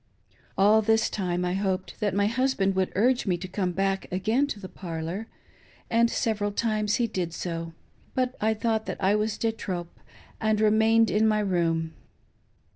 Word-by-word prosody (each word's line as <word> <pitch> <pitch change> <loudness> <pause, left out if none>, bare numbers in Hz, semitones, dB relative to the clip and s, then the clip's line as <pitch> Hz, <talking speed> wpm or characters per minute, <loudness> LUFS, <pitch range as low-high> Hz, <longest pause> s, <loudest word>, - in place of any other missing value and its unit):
All 210 +3 +5
this 220 +1 +2
time 180 -3 -1
I 180 - -1
hoped 190 -1 -2
that 205 -3 0
my 200 0 +3
husband 235 -4 +1
would 190 -1 0
urge 245 +3 +2
me 180 -2 +1
to 185 +2 -6
come 185 -1 -1
back 195 +1 -1
again 220 +10 +1
to 215 - -5
the 190 - -7
parlor, 175 +3 -5 0.6
and 235 +1 +4
several 210 -3 -1
times 215 -1 0
he 240 - +1
did 175 -6 -3
so, 165 -1 -4 0.4
but 255 -1 0
I 220 +1 +2
thought 220 0 -1
that - - -3
I 195 +1 +3
was 210 0 0
de 225 - 0
trop, 180 -6 -6 0.4
and 215 -1 +1
remained 220 +1 +4
in 220 +1 +3
my 215 -1 +2
room. 165 -4 0
205 Hz, 175 wpm, -26 LUFS, 185-220 Hz, 0.6 s, All